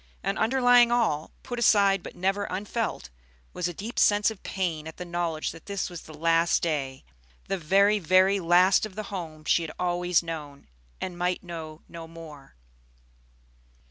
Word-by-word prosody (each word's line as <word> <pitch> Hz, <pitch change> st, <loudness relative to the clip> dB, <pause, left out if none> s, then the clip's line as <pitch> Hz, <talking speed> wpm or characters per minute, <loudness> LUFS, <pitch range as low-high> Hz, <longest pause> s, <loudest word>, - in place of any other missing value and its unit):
And 195 Hz, +2 st, -1 dB
underlying 245 Hz, 0 st, +5 dB
all, 215 Hz, -11 st, +1 dB
put 245 Hz, -1 st, -5 dB
aside 200 Hz, -4 st, +4 dB
but -, -, -10 dB
never 195 Hz, +3 st, 0 dB
unfelt, 210 Hz, -, -4 dB, 0.4 s
was 180 Hz, -, -2 dB
a -, -, -3 dB
deep 220 Hz, +7 st, -5 dB
sense 205 Hz, +1 st, +4 dB
of 215 Hz, -, -11 dB
pain 165 Hz, -5 st, -3 dB
at 160 Hz, -, -10 dB
the 180 Hz, -, -6 dB
knowledge 170 Hz, -2 st, -2 dB
that 165 Hz, -, -14 dB
this 200 Hz, -2 st, -3 dB
was 175 Hz, -, -7 dB
the 155 Hz, -, -13 dB
last 165 Hz, +2 st, +2 dB
day, 140 Hz, -5 st, -2 dB, 0.4 s
the 195 Hz, -, -1 dB
very, 200 Hz, +6 st, +3 dB
very 185 Hz, +2 st, +4 dB
last 180 Hz, +2 st, +4 dB
of 195 Hz, -, -17 dB
the 215 Hz, -, -4 dB
home 160 Hz, -5 st, -6 dB
she 170 Hz, -, +3 dB
had 160 Hz, -2 st, -5 dB
always 175 Hz, -1 st, +1 dB
known, 150 Hz, -4 st, -7 dB, 0.3 s
and 175 Hz, -1 st, -5 dB
might 180 Hz, 0 st, -1 dB
know 160 Hz, -3 st, -8 dB
no 165 Hz, -1 st, -9 dB
more. 160 Hz, -, -12 dB
175 Hz, 170 wpm, -26 LUFS, 165-200 Hz, 0.4 s, underlying